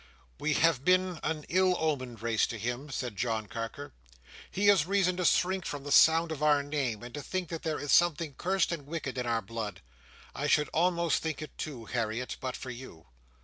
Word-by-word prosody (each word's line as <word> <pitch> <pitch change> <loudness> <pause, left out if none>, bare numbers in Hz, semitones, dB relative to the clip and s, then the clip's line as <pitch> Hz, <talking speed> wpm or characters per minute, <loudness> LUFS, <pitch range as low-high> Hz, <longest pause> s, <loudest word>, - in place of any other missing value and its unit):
"We 155 - +1
have 155 -4 +3
been 185 0 +2
an 155 -2 -3
ill 185 0 +3
omened 130 -8 -2
race 115 -2 +2
to 115 - -5
him," 125 +6 -4
said 125 -5 -4
John 110 0 -1
Carker. 115 +4 -6 0.6
"He 200 - -1
has 195 -6 +5
reason 190 -2 +2
to 180 - -1
shrink 185 +2 +2
from 145 -4 -5
the 145 - -6
sound 160 +3 +6
of 155 -2 -5
our 150 -2 +4
name, 140 -7 -2
and 120 - -9
to 145 - -5
think 185 +3 -3
that 165 -2 -5
there 160 -2 -2
is 145 - -3
something 165 -3 +3
cursed 190 +6 0
and 150 -5 -5
wicked 155 -4 -4
in 125 - -2
our 115 -1 0
blood. 105 -3 -5 0.5
I - - -2
should 150 -1 +3
almost 170 -1 +1
think 160 -1 -3
it 155 - -10
too, 130 -7 -6
Harriet, 120 +1 -3
but 130 -1 -3
for 130 - -7
you." 120 -10 -11
145 Hz, 205 wpm, -30 LUFS, 120-170 Hz, 0.6 s, sound